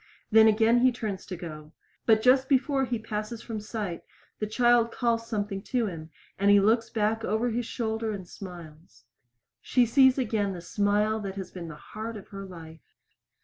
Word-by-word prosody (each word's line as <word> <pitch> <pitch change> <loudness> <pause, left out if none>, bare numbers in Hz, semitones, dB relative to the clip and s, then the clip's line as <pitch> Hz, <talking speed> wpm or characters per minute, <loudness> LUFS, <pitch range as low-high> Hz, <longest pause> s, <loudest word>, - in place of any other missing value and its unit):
Then 220 0 +7
again 225 +2 +4
he 255 +1 +5
turns 215 -5 -5
to 185 - -5
go. 155 -2 -9 0.3
But 220 -1 +4
just 260 +1 +4
before 270 0 +2
he 240 -1 -2
passes 220 +1 -5
from 225 -2 -5
sight 210 -4 -5 0.4
the 215 - -2
child 240 +1 +3
calls 230 -1 0
something 205 -3 -3
to 245 -3 0
him, 165 -5 -6 0.3
and 200 +1 +3
he 205 0 +7
looks 225 +3 +2
back 220 +1 0
over 225 +3 0
his 235 +1 -2
shoulder 220 -1 -2
and 190 -4 -6
smiles. 165 - -11 0.6
She 250 -1 +3
sees 260 +2 +5
again 215 -6 0
the 175 - -7
smile 205 +4 +1
that 195 -2 -5
has 190 -2 -6
been 175 -2 -7
the 160 - -8
heart 220 +7 -7
of 195 - -12
her 195 0 -7
life. 165 -3 -13
215 Hz, 185 wpm, -27 LUFS, 195-230 Hz, 0.6 s, Then